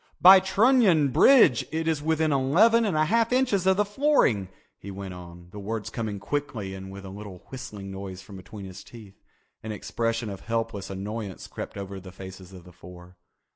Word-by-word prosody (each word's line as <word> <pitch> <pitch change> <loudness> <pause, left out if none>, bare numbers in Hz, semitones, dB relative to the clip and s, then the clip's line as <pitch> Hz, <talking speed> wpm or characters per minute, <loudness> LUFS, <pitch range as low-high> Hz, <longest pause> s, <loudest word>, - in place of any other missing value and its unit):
"By 190 +2 +9
Trunion 190 - +3
bridge 155 - +5
it 160 +1 -2
is 160 -2 0
within 160 0 +1
eleven 190 - +4
and 185 -7 0
a 155 - +3
half 230 +6 +1
inches 250 -8 +1
of 190 0 +4
the 210 - +2
flooring," 205 - +2 0.3
he 100 - -9
went 95 -1 -7
on, 85 0 -12
the 105 - -9
words 105 +1 -5
coming 110 -4 -4
quickly 115 -3 -4
and 95 0 -8
with 100 0 -10
a - - -8
little 100 -2 -10
whistling 105 -7 -8
noise 95 -1 -7
from 100 0 -12
between 95 +2 -10
his 95 +1 -10
teeth. 105 -5 -14 0.4
An 110 - -6
expression 115 +1 -3
of 95 - -7
helpless 115 -3 -3
annoyance 100 0 -6
crept - - -8
over 100 -1 -6
the 95 0 -12
faces 95 0 -11
of 90 -2 -12
the 90 0 -16
four. 90 +1 -14
110 Hz, 190 wpm, -26 LUFS, 95-160 Hz, 0.4 s, By